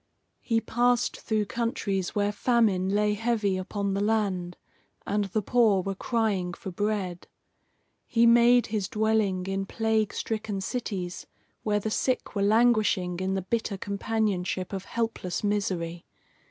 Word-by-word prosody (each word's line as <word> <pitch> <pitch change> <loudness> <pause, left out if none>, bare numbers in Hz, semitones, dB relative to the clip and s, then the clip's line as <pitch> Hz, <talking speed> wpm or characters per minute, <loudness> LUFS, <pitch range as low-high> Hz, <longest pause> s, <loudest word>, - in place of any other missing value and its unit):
He 230 -2 +1
passed 245 +1 +1
through 215 -2 0
countries 205 -5 -2
where 205 0 +1
famine 210 -5 +2
lay 210 +1 +2
heavy 215 -2 0
upon 195 +1 -2
the 195 - -1
land, 195 -5 0 0.5
and 205 0 0
the 200 +2 -2
poor 215 -4 +3
were 195 - -2
crying 195 -5 -1
for 190 - -7
bread. 195 -2 -2 0.8
He 230 0 +3
made 240 +1 +6
his 205 -3 -1
dwelling 215 -4 +1
in 195 0 -2
plague 220 -1 0
stricken 215 -3 -3
cities 190 -4 -4 0.3
where 210 -1 +1
the 215 +1 -3
sick 255 +3 -1
were 200 - -1
languishing 210 -5 +3
in 190 +1 -1
the 190 - -2
bitter 220 0 -2
companionship 200 -2 -2
of 195 0 -4
helpless 225 -6 -3
misery. 185 -5 -2
205 Hz, 140 wpm, -27 LUFS, 190-225 Hz, 0.8 s, made